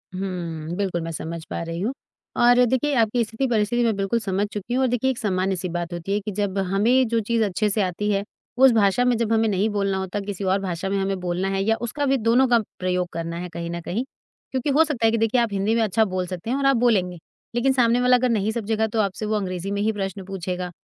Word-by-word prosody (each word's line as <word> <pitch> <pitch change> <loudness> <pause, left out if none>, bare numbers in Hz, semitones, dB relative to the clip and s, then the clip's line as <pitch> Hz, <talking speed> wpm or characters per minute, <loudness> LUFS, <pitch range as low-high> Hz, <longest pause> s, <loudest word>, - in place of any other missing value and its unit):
उहुँ, 170 -4 -4
बिल्कुल 190 -4 -1
मैं 165 0 -4
समझ 160 +1 -5
पा - - -3
रही 165 0 -5
हूँ 240 +6 -1 0.5
और 245 +1 +6
देखिए, 260 +4 +1
आपकी 230 0 +2
स्थिति-परिस्थिति 225 0 0
मैं 225 -3 +2
बिल्कुल 195 +4 0
समझ 200 -1 -1
चुकी 210 +4 -4
हूँ 260 - +2
और 260 - +3
देखिए, 245 +2 +1
एक 245 - -6
सामान्य-सी 190 -4 -1
बात 175 0 -4
होती 175 +3 -3
है 205 - +1
कि 210 +1 -5
जब 200 -1 -2
हमें 205 +7 +2
जो 230 0 +1
चीज़ 225 +1 0
अच्छे 210 +1 0
से 205 +1 +1
आती 190 +3 -1
है, 200 0 0 0.3
उस 265 0 +7
भाषा 220 +2 +3
में 250 - +3
जब 230 -1 -1
हमें 225 0 +3
नहीं 200 +2 +1
बोलना 200 -2 0
होता, 190 +1 -3
किसी 200 -1 -5
और 190 +1 +2
भाषा 185 0 -3
में 195 - 0
हमें 195 0 -1
बोलना 180 +1 -2
है 195 0 0
या 225 +2 +2
उसका 285 +5 -2
भी 270 0 +2
दोनों 235 +3 +3
का 240 -1 +4 0.2
प्रयोग 180 -1 0
करना 170 0 -4
है 180 0 -5
कहीं 170 0 -5
न 170 0 -4
कहीं 205 +9 -2 0.5
क्योंकि 260 +2 -1
हो 290 +3 +5
सकता 285 -8 -1
है 225 - +5
कि 230 - +1
देखिए, 225 +2 +2
आप 230 - +1
हिंदी 200 +3 +1
में 230 - +2
अच्छा 220 +1 +2
बोल 185 -1 -2
सकते 185 +4 -6
हैं 260 - +1
और 280 - -1
आप 275 0 +5
बोलेंगे। 195 -7 +2 0.4
लेकिन 265 +2 +2
सामने 240 -1 +3
वाला 250 0 +5
अगर 250 0 +1
नहीं 215 -2 +1
समझेगा 220 -1 -1
तो 220 +1 -2
आपसे 200 +1 -2
वो 215 0 0
अंग्रेज़ी 190 -1 -3
में 200 0 -1
ही 220 +1 +2
प्रश्न 195 -2 -4
पूछेगा। 180 -1 -4
205 Hz, 255 wpm, -23 LUFS, 185-235 Hz, 0.5 s, उस